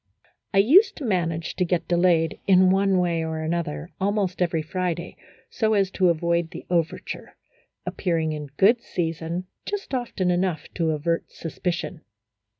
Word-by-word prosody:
I 195 - 0
used 295 - +6
to 290 - -6
manage 165 -6 -1
to 185 - +2
get 175 -1 -1
delayed, 170 -2 +2
in 185 -1 +6
one 195 0 +3
way 170 -2 +1
or 160 0 -3
another, 160 - -3
almost 195 -2 0
every 165 -3 +1
Friday, 175 +1 -3 0.4
so 220 -1 +1
as 195 -2 +2
to 185 -2 +3
avoid 170 0 +1
the - - -9
overture, 170 -2 -2 0.5
appearing 165 -4 -1
in 150 -1 -5
good 230 +5 +5
season 165 0 -3 0.2
just 405 -8 -5
often 230 -8 0
enough 175 -3 0
to 165 -2 0
avert 160 +2 -1
suspicion. 170 0 -4
175 Hz, 150 wpm, -24 LUFS, 165-190 Hz, 0.5 s, used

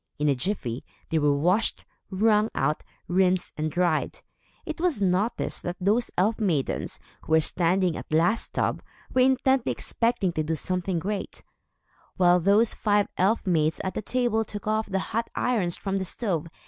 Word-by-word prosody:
In 150 - 0
a - - +4
jiffy, 130 - -3 0.3
they 160 - +2
were 145 -1 +2
washed, 180 +9 +1 0.2
wrung 210 +2 +3
out, 150 +3 0 0.3
rinsed 185 0 +1
and 155 +1 -2
dried. 175 - 0 0.4
It 315 +1 -5
was 345 - +1
noticed 195 +4 0
that 175 - -4
those 210 +6 +1
elf 215 +5 +2
maidens, 170 -11 -1 0.2
who 160 - -3
were 160 - +7
standing 175 +2 +1
at - - -8
the 155 - +2
last 195 +8 +1
tub, - - 0 0.3
were 255 - +4
intently 265 0 +3
expecting 230 -6 0
to 155 - -1
do 160 +1 -1
something 180 +2 -2
great, 200 +4 -4 0.7
while 180 -1 +5
those 205 +6 +3
five 205 -1 +1
elf 200 +6 +1
maids 160 -4 +1
at 190 - -2
the - - -3
table 240 -2 0
took 210 0 -7
off 215 0 0
the 195 - 0 0.2
hot 230 +1 -1
irons 210 -9 0
from 195 -1 -2
the 190 - -2
stove. 180 -5 -2
190 Hz, 175 wpm, -26 LUFS, 170-220 Hz, 0.7 s, were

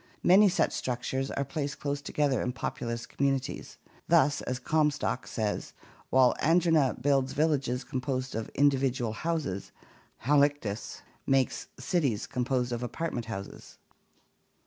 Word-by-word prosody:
Many 195 +3 +7
such 185 - +1
structures 130 +2 -2
are 140 - -2
placed 145 -3 -4
close 140 -1 -2
together 145 -2 0
in 125 - -2
popu 120 - -4
lous 115 0 -3
communities. 135 -1 -2 0.3
Thus, 150 -4 +4
as 125 - -3
Comstock 150 -1 0
says, 110 -3 -3 0.4
"while 130 -1 +5
Andrena 165 -4 +3
builds 135 0 +1
villages 140 -5 +1
composed 130 0 -3
of 110 0 -4
individual 135 -4 +2
houses, 155 - -3 0.5
Halictus 140 -6 +1 0.2
makes 135 -1 +1
cities 135 - 0
composed 125 -1 -1
of 120 0 -2
apartment 125 -2 -3
houses." 100 -3 -8
135 Hz, 125 wpm, -29 LUFS, 125-145 Hz, 0.5 s, Many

